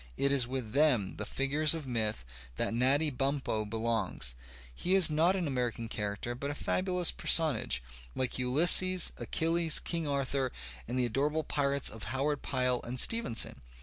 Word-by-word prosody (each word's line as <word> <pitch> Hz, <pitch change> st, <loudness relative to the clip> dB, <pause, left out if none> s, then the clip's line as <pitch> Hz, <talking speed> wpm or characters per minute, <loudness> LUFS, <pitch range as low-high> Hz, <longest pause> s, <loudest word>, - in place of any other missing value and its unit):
It 140 Hz, -, +1 dB
is 135 Hz, -3 st, +3 dB
with 125 Hz, -4 st, -6 dB
them, 130 Hz, -8 st, +1 dB
the 105 Hz, -, -5 dB
figutegLof 150 Hz, +5 st, +1 dB
P^th, 115 Hz, -5 st, -1 dB, 0.4 s
that -, -, -2 dB
Natty 140 Hz, +6 st, +1 dB
Bumppo 135 Hz, -5 st, -3 dB
belongs; 110 Hz, -, -1 dB, 0.4 s
he 180 Hz, -, 0 dB
is 185 Hz, -5 st, +8 dB
not 165 Hz, +5 st, +2 dB
an 185 Hz, -3 st, -3 dB
American 125 Hz, -5 st, -3 dB
character 105 Hz, +2 st, -5 dB
but 140 Hz, +4 st, -6 dB
a 145 Hz, -, -5 dB
fabulous 180 Hz, +1 st, 0 dB
personage, 110 Hz, -, +1 dB, 0.3 s
like 130 Hz, -1 st, -2 dB
Ulysses, 175 Hz, +7 st, +6 dB
AchUles, 165 Hz, 0 st, +2 dB
Eang 165 Hz, -3 st, -4 dB
Arthur, 135 Hz, -2 st, -2 dB, 0.4 s
and 125 Hz, +3 st, -4 dB
the 125 Hz, -, +1 dB
adorable 145 Hz, +6 st, -2 dB
pirates 140 Hz, -1 st, -1 dB
of 110 Hz, -, -6 dB
Howard 135 Hz, +5 st, -3 dB
Pyle 125 Hz, -2 st, -1 dB
and 125 Hz, +2 st, -4 dB
Stevenson. 225 Hz, -, 0 dB
135 Hz, 150 wpm, -29 LUFS, 120-155 Hz, 0.4 s, is